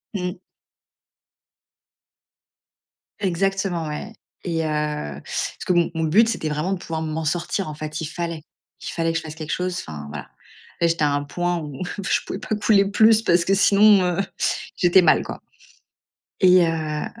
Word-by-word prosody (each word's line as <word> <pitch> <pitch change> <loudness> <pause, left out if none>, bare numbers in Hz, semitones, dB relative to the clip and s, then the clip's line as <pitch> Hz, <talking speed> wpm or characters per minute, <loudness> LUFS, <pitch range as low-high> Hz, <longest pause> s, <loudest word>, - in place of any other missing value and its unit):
Mmh. 180 -2 -3 2.8
Exactement 190 -3 -1
ouais 215 +9 -6 0.3
et 165 -2 -1
heu, - - -1 0.5
parce - - -4
que 185 - +2
mon 175 -1 +2
mon 160 - 0
but, 215 +9 +4
c'était 170 -7 -2
vraiment 155 +5 -2
de 195 - -2
pouvoir 160 -2 -4
m'en 160 0 -3
sortir. 175 +3 -1
En 155 - -5
fait, 155 0 -6
il 160 - -3
fallait 165 0 -5 0.4
il - - -7
fallait 165 -1 -1
que 165 - -1
je - - -4
fasse 155 -1 -8
quelque 155 -1 -6
chose. 180 0 -1
Enfin, 75 -2 -8
voilà, 75 -1 -8 0.5
là, 170 - +3
j'étais 165 -2 0
à 145 - +3
un 145 0 -1
point 175 +4 -1
où 150 +1 -6 0.2
je 195 - +1
pouvais 190 - -5
pas 215 - -2
couler 205 -1 +3
plus 220 +1 +5
parce 175 -5 +3
que 190 - +1
sinon, 200 +1 +6
heu, 180 0 +1 0.6
j'étais 180 +1 +5
mal, 175 - +4
quoi - - -8 1.0
et 185 -2 +6
heu 155 -2 -2
170 Hz, 170 wpm, -22 LUFS, 155-190 Hz, 2.8 s, sinon